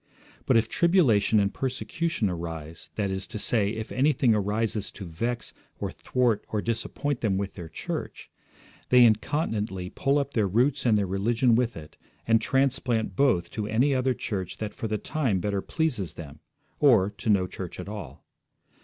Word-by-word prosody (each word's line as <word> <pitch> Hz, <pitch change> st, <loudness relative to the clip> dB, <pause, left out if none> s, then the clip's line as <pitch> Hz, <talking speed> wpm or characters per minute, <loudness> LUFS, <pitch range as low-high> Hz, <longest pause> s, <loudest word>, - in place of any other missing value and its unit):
But 130 Hz, -, +5 dB
if 115 Hz, 0 st, +2 dB
tribulation 120 Hz, -, +3 dB
and 100 Hz, -1 st, +1 dB
persecution 150 Hz, -, -2 dB
arise, 80 Hz, -3 st, -6 dB
that 100 Hz, -3 st, -1 dB
is 95 Hz, 0 st, -3 dB
to 115 Hz, -, -5 dB
say, 105 Hz, -1 st, +2 dB
if 110 Hz, 0 st, -5 dB
anything 130 Hz, -3 st, +3 dB
arises 105 Hz, 0 st, -1 dB
to 100 Hz, -, -9 dB
vex 115 Hz, +9 st, -3 dB, 0.3 s
or -, -, -3 dB
thwart 125 Hz, -4 st, 0 dB
or 105 Hz, -, -1 dB
disappoint 120 Hz, +5 st, -2 dB
them 100 Hz, -4 st, +1 dB
with 100 Hz, 0 st, -3 dB
their 85 Hz, -4 st, -8 dB
church, -, -, -6 dB, 0.6 s
they 125 Hz, -1 st, +7 dB
incontinently 110 Hz, -, 0 dB
pull 140 Hz, +1 st, +1 dB
up 140 Hz, -1 st, -1 dB
their 110 Hz, -4 st, +2 dB
roots 125 Hz, +7 st, +2 dB
and 110 Hz, -3 st, +4 dB
their 100 Hz, -, +1 dB
religion 115 Hz, +6 st, +2 dB
with 120 Hz, -2 st, +1 dB
it, 75 Hz, -1 st, -11 dB, 0.3 s
and 115 Hz, -1 st, +4 dB
transplant 125 Hz, -6 st, 0 dB
both 90 Hz, -10 st, +2 dB
to 105 Hz, -1 st, -3 dB
any 120 Hz, +6 st, +2 dB
other 130 Hz, -1 st, +1 dB
church 100 Hz, -7 st, -4 dB
that 110 Hz, -1 st, -4 dB
for 115 Hz, -, -4 dB
the 105 Hz, 0 st, -1 dB
time 115 Hz, -3 st, -1 dB
better 100 Hz, +1 st, -1 dB
pleases 130 Hz, -, -1 dB
them, 75 Hz, -2 st, -9 dB, 0.4 s
or 115 Hz, -10 st, +5 dB
to -, -, -3 dB
no 100 Hz, -3 st, +4 dB
church 90 Hz, -1 st, -7 dB
at 90 Hz, -, -6 dB
all. 105 Hz, -1 st, -8 dB
110 Hz, 170 wpm, -27 LUFS, 100-125 Hz, 0.6 s, they